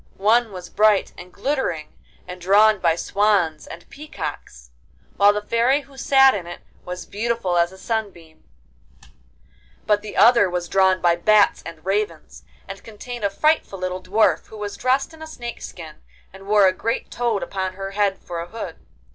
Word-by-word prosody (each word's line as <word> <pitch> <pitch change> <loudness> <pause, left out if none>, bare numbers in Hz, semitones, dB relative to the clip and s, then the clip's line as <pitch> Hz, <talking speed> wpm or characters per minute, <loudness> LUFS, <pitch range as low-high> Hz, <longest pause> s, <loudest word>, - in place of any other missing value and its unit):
One 225 +3 +2
was 180 -2 -8
bright 210 0 +2
and 180 0 -12
glittering, 200 - -3 0.3
and 180 0 -9
drawn 210 +3 +4
by 170 -3 +2
swans 190 -5 0
and 170 +1 -11
peacocks, 155 - -8 0.5
while 205 0 +6
the 210 0 -3
Fairy 240 +6 +2
who 275 0 -19
sat 270 0 +5
in 180 -4 -5
it 175 - -9 0.2
was 180 0 -7
beautiful 225 -3 -2
as 170 0 +2
a 190 - -14
sunbeam; 190 -8 -5 1.4
but 210 -1 +2
the 210 0 -8
other 235 -4 +6
was 175 -1 -3
drawn 190 0 +2
by 170 -1 +3
bats 210 +3 +3
and 165 0 -11
ravens, 195 -4 -3 0.2
and 195 +1 -9
contained 230 +2 -9
a 200 - +2
frightful 300 -1 0
little 185 0 -4
Dwarf, 205 +4 +1
who 220 - -12
was 205 -1 -5
dressed 265 +4 0
in 320 - -15
a 315 - -7
snake's 240 -6 -7
skin, 160 -3 -11 0.4
and 195 0 -13
wore 205 -1 +5
a 185 - +4
great 230 +5 -3
toad 235 -4 -1
upon 190 -1 -4
her 195 +1 -6
head 200 -1 0
for 170 -1 -7
a 170 - -7
hood. 225 +4 -7
200 Hz, 175 wpm, -22 LUFS, 180-225 Hz, 1.4 s, while